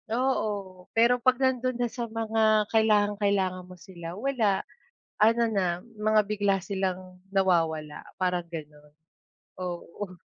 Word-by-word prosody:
Oo, 210 Hz, -7 st, -2 dB
pero 240 Hz, +2 st, +4 dB
'pag 255 Hz, +1 st, +4 dB
nandun 255 Hz, -1 st, +1 dB
na 245 Hz, -, +1 dB
sa 235 Hz, -2 st, -4 dB
mga 220 Hz, -1 st, +2 dB
kailangang 210 Hz, -2 st, +3 dB
kailangan 190 Hz, -3 st, +1 dB
mo 180 Hz, -, -10 dB
sila 175 Hz, -1 st, -9 dB
wala, 220 Hz, -6 st, 0 dB, 0.6 s
ano 230 Hz, +2 st, +5 dB
na 200 Hz, -4 st, 0 dB, 0.3 s
mga 215 Hz, 0 st, +3 dB
bigla 205 Hz, -1 st, +1 dB
silang 185 Hz, -2 st, -4 dB
nawawala 165 Hz, -6 st, +1 dB, 0.2 s
parang 180 Hz, -2 st, 0 dB
gano'n, 150 Hz, -2 st, -9 dB, 0.7 s
oo. 180 Hz, +2 st, -6 dB
200 Hz, 120 wpm, -27 LUFS, 180-225 Hz, 0.7 s, ano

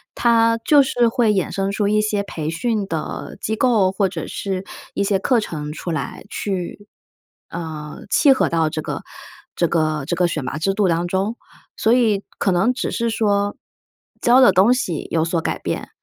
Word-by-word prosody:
它 230 Hz, -1 st, +3 dB
就 290 Hz, -2 st, +6 dB
是 245 Hz, -3 st, +2 dB
会 225 Hz, -2 st, +2 dB
衍 190 Hz, -4 st, 0 dB
生 195 Hz, 0 st, -1 dB
出 205 Hz, 0 st, 0 dB
一 215 Hz, +1 st, +3 dB
些 210 Hz, -1 st, 0 dB
培 155 Hz, -5 st, -4 dB
训 210 Hz, +3 st, -1 dB
的 160 Hz, -1 st, -5 dB
机 220 Hz, -, -2 dB
构， 220 Hz, -6 st, +3 dB
或 195 Hz, -1 st, +1 dB
者 -, -, -5 dB
是 190 Hz, -1 st, -4 dB, 0.3 s
一 -, -, +1 dB
些 195 Hz, -1 st, +1 dB
课 245 Hz, +4 st, +2 dB
程 150 Hz, -8 st, -5 dB
出 170 Hz, +3 st, -5 dB
来 150 Hz, -5 st, -4 dB
去， 195 Hz, +1 st, -4 dB, 0.6 s
呃， 155 Hz, -3 st, -6 dB
契 275 Hz, +3 st, +5 dB
合 260 Hz, -, +1 dB
到 165 Hz, -2 st, +1 dB
这 155 Hz, -, -3 dB
个 -, -, -5 dB, 0.5 s
这 170 Hz, -, +2 dB
个 155 Hz, -2 st, 0 dB
这 175 Hz, -, 0 dB
个 175 Hz, 0 st, +2 dB
选 155 Hz, -4 st, -3 dB
拔 130 Hz, +4 st, -4 dB
制 195 Hz, +5 st, 0 dB
度 200 Hz, -2 st, +2 dB
当 170 Hz, +1 st, 0 dB
中。 195 Hz, +5 st, -1 dB, 0.4 s
所 225 Hz, +2 st, +3 dB
以 220 Hz, -5 st, +2 dB, 0.2 s
可 195 Hz, -, +2 dB
能 190 Hz, +8 st, +2 dB
只 260 Hz, -, -3 dB
是 235 Hz, -1 st, -1 dB
说 205 Hz, -2 st, +1 dB, 0.6 s
教 245 Hz, +2 st, +5 dB
的 245 Hz, -, +7 dB
东 195 Hz, +7 st, +5 dB
西 180 Hz, -, -2 dB
有 160 Hz, -1 st, +2 dB
所 165 Hz, 0 st, 0 dB
改 -, -, -2 dB
变， -, -, -4 dB
195 Hz, 205 characters per minute, -21 LUFS, 170-225 Hz, 0.6 s, 的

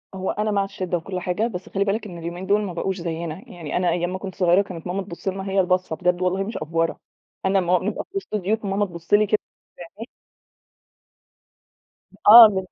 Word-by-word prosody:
هو 190 Hz, 0 st, -2 dB
أنا 210 Hz, +1 st, -1 dB
مع 200 Hz, -1 st, +2 dB
الشِّدة 185 Hz, -2 st, -3 dB
وكل 180 Hz, +2 st, -5 dB
حاجة، 180 Hz, +5 st, -1 dB
بس 185 Hz, -5 st, -7 dB
خلِّ 200 Hz, 0 st, 0 dB
بالك 215 Hz, +3 st, -1 dB
إن 175 Hz, -3 st, -9 dB
اليومين 170 Hz, +3 st, -6 dB
دُول 205 Hz, +2 st, +2 dB
ما 195 Hz, -4 st, -4 dB
بقوش 190 Hz, +2 st, -2 dB
زيّنا، 165 Hz, -1 st, -4 dB
يعني 170 Hz, -6 st, -5 dB
أنا 180 Hz, -1 st, +1 dB
أيام 175 Hz, +1 st, 0 dB
ما 185 Hz, -, -2 dB
كنت 190 Hz, -2 st, -7 dB
صغيرة 180 Hz, +1 st, +4 dB
كانت 185 Hz, -3 st, -7 dB
ماما 190 Hz, +2 st, -2 dB
تبُصّ 175 Hz, 0 st, -10 dB
لنا، 195 Hz, +1 st, -3 dB
هي 195 Hz, 0 st, +1 dB
البَصّة 185 Hz, -3 st, +1 dB
بجد 180 Hz, 0 st, 0 dB
والله 185 Hz, +2 st, +1 dB
مش 220 Hz, +3 st, -5 dB
أفورة، 165 Hz, +1 st, -1 dB, 0.5 s
أنا 195 Hz, +1 st, +3 dB
لمّا 180 Hz, -1 st, +2 dB
أبقى 190 Hz, +4 st, -2 dB
في 395 Hz, -, -4 dB
وسط 300 Hz, -, -5 dB
ضيوف 210 Hz, +3 st, -1 dB
فماما 200 Hz, +1 st, 0 dB
تبُصّ 170 Hz, +1 st, -8 dB
لي 210 Hz, +1 st, +6 dB
كده 215 Hz, +1 st, +2 dB, 0.6 s
بعينيها 225 Hz, +3 st, -8 dB, 2.2 s
آه 225 Hz, +2 st, +12 dB
من 190 Hz, -3 st, -2 dB
190 Hz, 210 wpm, -23 LUFS, 175-200 Hz, 2.2 s, آه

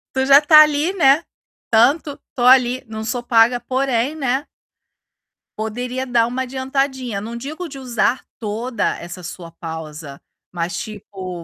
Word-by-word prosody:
Tu 265 Hz, 0 st, +1 dB
já 275 Hz, +1 st, +8 dB
tá 305 Hz, +1 st, +8 dB
ali, 305 Hz, +4 st, +2 dB
né, 320 Hz, -3 st, +4 dB, 0.5 s
tanto 275 Hz, +6 st, +3 dB, 0.2 s
tô 245 Hz, -, -3 dB
ali, 250 Hz, 0 st, +5 dB
não 220 Hz, 0 st, -6 dB
sou 245 Hz, +2 st, -2 dB
paga, 240 Hz, 0 st, +3 dB
porém, 260 Hz, +2 st, -1 dB
né 270 Hz, 0 st, -1 dB, 1.1 s
poderia 245 Hz, +4 st, -4 dB
dar 235 Hz, -2 st, +2 dB
uma 250 Hz, +2 st, -3 dB
adiantadinha. 260 Hz, -4 st, -2 dB
Não 230 Hz, +2 st, -7 dB
digo 310 Hz, +8 st, -6 dB
de 275 Hz, -, -9 dB
usar 250 Hz, 0 st, 0 dB
toda 230 Hz, +2 st, -2 dB
essa 175 Hz, +1 st, -9 dB
sua 170 Hz, 0 st, -8 dB
pausa, 160 Hz, -3 st, -8 dB, 0.3 s
mas 170 Hz, -1 st, -3 dB
tipo, 190 Hz, -4 st, -7 dB
245 Hz, 140 wpm, -20 LUFS, 215-270 Hz, 1.1 s, já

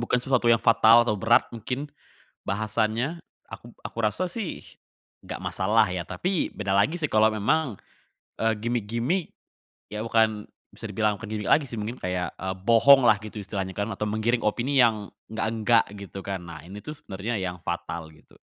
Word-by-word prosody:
Bukan 120 Hz, +1 st, +1 dB
sesuatu 125 Hz, -2 st, +1 dB
yang 115 Hz, -1 st, +5 dB
fatal 115 Hz, +1 st, +6 dB
atau 105 Hz, -3 st, +1 dB
berat 115 Hz, +4 st, +4 dB
mungkin, 125 Hz, +5 st, -4 dB, 0.6 s
bahasannya, 110 Hz, -, -1 dB, 0.3 s
aku 120 Hz, -, -11 dB
aku -, -, -8 dB
rasa 110 Hz, +13 st, 0 dB
sih, 200 Hz, -1 st, -5 dB, 0.6 s
nggak -, -, -6 dB
masalah 105 Hz, +3 st, +2 dB
ya. 90 Hz, -1 st, -3 dB
Tapi 180 Hz, -, -2 dB
beda 100 Hz, -1 st, -1 dB
lagi 150 Hz, -, +2 dB
sih 150 Hz, -, 0 dB
kalau 110 Hz, -1 st, +4 dB
memang, 115 Hz, +3 st, 0 dB, 0.6 s
eee, 110 Hz, 0 st, +3 dB
gimik-gimik, 120 Hz, -, -1 dB, 0.6 s
ya 105 Hz, -, -3 dB
bukan 110 Hz, -2 st, +1 dB, 0.2 s
bisa -, -, -9 dB
dibilang 105 Hz, -2 st, 0 dB
bukan 110 Hz, -, -9 dB
gimik 105 Hz, -2 st, -3 dB
lagi 150 Hz, -, +4 dB
sih 115 Hz, -, -6 dB
mungkin 110 Hz, +4 st, -5 dB
kayak, 90 Hz, 0 st, -2 dB
eee, 95 Hz, 0 st, -3 dB
bohong 125 Hz, +3 st, +7 dB
lah 105 Hz, -3 st, +5 dB
gitu 110 Hz, 0 st, -9 dB
istilahnya 95 Hz, -1 st, -4 dB
kan, 100 Hz, +1 st, -1 dB
atau 105 Hz, -, -3 dB
menggiring 115 Hz, +3 st, 0 dB
opini 130 Hz, +5 st, +2 dB
yang, 110 Hz, -4 st, +1 dB, 0.2 s
enggak 110 Hz, 0 st, -2 dB
enggak 115 Hz, +1 st, +3 dB, 0.2 s
gitu 100 Hz, -, -7 dB
kan. 95 Hz, -2 st, -3 dB
Nah 85 Hz, -3 st, -9 dB
ini 100 Hz, +3 st, -9 dB
tuh 150 Hz, 0 st, -8 dB
sebenarnya 105 Hz, 0 st, -4 dB
yang 90 Hz, -1 st, -3 dB
fatal 85 Hz, -1 st, -4 dB
gitu. 75 Hz, -, -22 dB
110 Hz, 175 wpm, -26 LUFS, 100-120 Hz, 0.6 s, bohong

